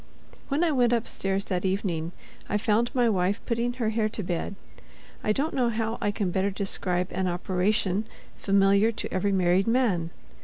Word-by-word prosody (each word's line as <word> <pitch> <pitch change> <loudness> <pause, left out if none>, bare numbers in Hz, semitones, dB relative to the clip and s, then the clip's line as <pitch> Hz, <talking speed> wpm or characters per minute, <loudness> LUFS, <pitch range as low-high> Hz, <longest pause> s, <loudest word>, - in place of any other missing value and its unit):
When 290 +4 +1
I 335 - +3
went 245 -4 +3
upstairs 195 -4 -1
that 180 -2 -2
evening, 185 -4 -1 0.4
I 205 - +1
found 220 +3 +1
my 245 -2 +3
wife 195 -1 +1
putting 235 +1 0
her 235 -3 -1
hair 220 -1 +1
to 215 - -5
bed—I 185 +4 -6
don't 285 +9 0
know 250 -3 +2
how 225 0 -2
I 205 - +1
can 200 -3 -1
better 190 +2 +1
describe 185 -2 -1
an 185 0 -1
operation 185 +3 0 0.3
familiar 200 +2 +3
to 225 - -6
every 195 +2 +1
married 185 +1 +2
man. 225 -9 +2
200 Hz, 165 wpm, -27 LUFS, 185-230 Hz, 0.4 s, I